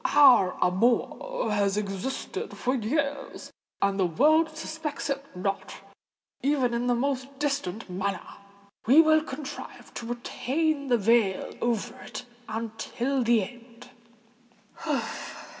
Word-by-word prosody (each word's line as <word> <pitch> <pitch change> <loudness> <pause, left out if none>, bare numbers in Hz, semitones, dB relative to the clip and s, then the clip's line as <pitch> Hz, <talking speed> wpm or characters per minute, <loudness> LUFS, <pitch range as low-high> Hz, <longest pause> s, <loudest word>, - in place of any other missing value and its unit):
Our 250 -10 +7
amour 230 - +1
has 200 -1 +2
existed 200 +5 -4
for 255 - 0
years—and 265 -6 -2
the 185 - +4
world 310 - +4
suspects 315 -3 -4
it 275 0 -2
not, 195 +2 -3 0.7
even 265 -3 +2
in 235 +1 0
the 245 - +3
most 270 +1 -2
distant 270 -8 -2
manner:—we 200 - -1
will 315 -1 +6
contrive 290 -1 -8
to 230 - -6
retain 280 +5 -1
the 245 -2 +4
veil 215 -2 +2
over 240 +1 -1
it - - -7 0.2
until 230 +4 -2
the 230 -3 +4
end." 240 +1 -12
240 Hz, 110 wpm, -27 LUFS, 205-280 Hz, 0.7 s, Our